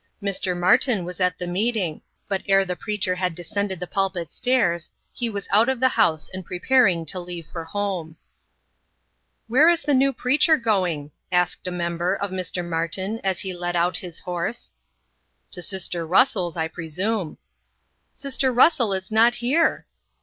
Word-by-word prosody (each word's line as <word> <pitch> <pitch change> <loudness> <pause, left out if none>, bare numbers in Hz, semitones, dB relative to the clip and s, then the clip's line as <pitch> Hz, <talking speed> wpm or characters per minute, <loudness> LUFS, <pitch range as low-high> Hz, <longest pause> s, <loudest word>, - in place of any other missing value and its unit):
Mr. 195 -3 -2
Martin 195 +2 +3
was 180 +1 -7
at 180 -1 +1
the 180 - -4
meeting, 185 -2 -1 0.3
but 195 -2 -1
ere 195 0 +4
the 180 -1 -3
preacher 205 -2 -1
had 180 -2 -2
descended 190 +2 -3
the 180 - -4
pulpit 185 -4 -2
stairs, 205 -10 +1 0.2
he 240 -2 -1
was 200 -3 -5
out 220 +5 +5
of 265 -2 -1
the 260 +1 +4
house 160 -10 +1
and 185 0 -5
preparing 180 -1 +2
to 180 +4 -3
leave 175 -2 -7
for 165 +1 -7
home. 175 -3 -3 1.3
"Where 275 +8 +5
is 340 -1 +2
the 290 0 +1
new 270 +1 +4
preacher 295 +5 +3
going?" 180 - 0 0.2
asked 180 0 +1
a - - -2
member, 175 +1 -1
of 200 -1 -4
Mr. 180 -1 -4
Martin, 175 +6 -2
as 190 -2 0
he 190 -2 -4
led 175 0 -3
out 175 +1 +1
his 175 -3 -7
horse. 180 +6 -4 0.8
"To 180 - -4
sister 175 -2 -2
Russell's, 180 0 +2
I 160 0 0
presume." 175 +3 -3 0.7
"Sister 275 -1 -1
Russell 250 -4 +4
is 190 +1 -3
not 230 +2 +5
here." 265 +8 +1
190 Hz, 165 wpm, -23 LUFS, 175-225 Hz, 1.3 s, out